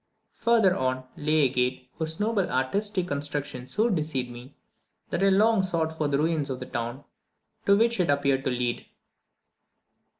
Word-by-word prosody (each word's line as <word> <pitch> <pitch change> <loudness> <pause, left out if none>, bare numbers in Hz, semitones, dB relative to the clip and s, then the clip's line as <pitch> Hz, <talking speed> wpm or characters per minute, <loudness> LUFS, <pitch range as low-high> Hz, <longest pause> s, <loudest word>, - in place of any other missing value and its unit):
Further 225 -6 +3
on, 130 0 -1
lay 155 +1 +2
a 140 - +5
gate, 125 0 -1
whose 160 0 -3
noble 210 -3 +1
artistic 185 +8 -1
construction 145 -3 -3
so 215 - +1
deceived 150 - -1
me, 120 +3 -11 0.6
that - - -1
I 195 - +5
long 210 +2 +4
sought 165 -4 -1
for 155 -2 0
the 140 -1 +1
ruins 155 -1 0
of 130 -1 -3
the - - -5
town 120 +3 -4 0.6
to 200 0 +6
which 230 0 +2
it 180 - +2
appeared 140 -2 +2
to - - +2
lead. 125 -1 -2
150 Hz, 165 wpm, -26 LUFS, 130-190 Hz, 0.6 s, to